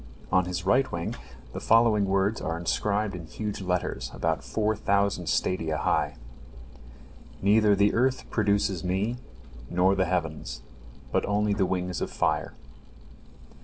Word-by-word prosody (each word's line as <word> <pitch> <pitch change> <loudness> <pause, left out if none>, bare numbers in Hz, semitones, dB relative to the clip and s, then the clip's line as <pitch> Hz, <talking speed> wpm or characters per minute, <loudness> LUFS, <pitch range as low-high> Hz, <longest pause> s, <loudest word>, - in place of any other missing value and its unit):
On 90 -1 +3
his 90 0 -4
right 130 +7 +3
wing 85 0 -3 0.4
the - - -4
following 115 -3 +4
words 100 +2 +1
are 80 - -2
inscribed 100 +4 0
in 85 -3 -7
huge 105 +3 -5
letters, 90 -9 -2
about 80 -1 -1
four 110 0 0
thousand 100 -5 0
stadia 80 -3 0
high: - - 0 1.2
"Neither 105 +1 +4
the 100 +1 +3
earth 130 +2 +1
produces 100 -4 +1
me, 95 +7 -1 0.5
nor 90 +2 +3
the 95 -1 +1
heavens, 80 -3 -3 0.5
but - - +1
only 105 0 +1
the 100 -2 +1
wings 90 0 -2
of - - -2
fire." - - -1
100 Hz, 135 wpm, -27 LUFS, 90-105 Hz, 1.2 s, following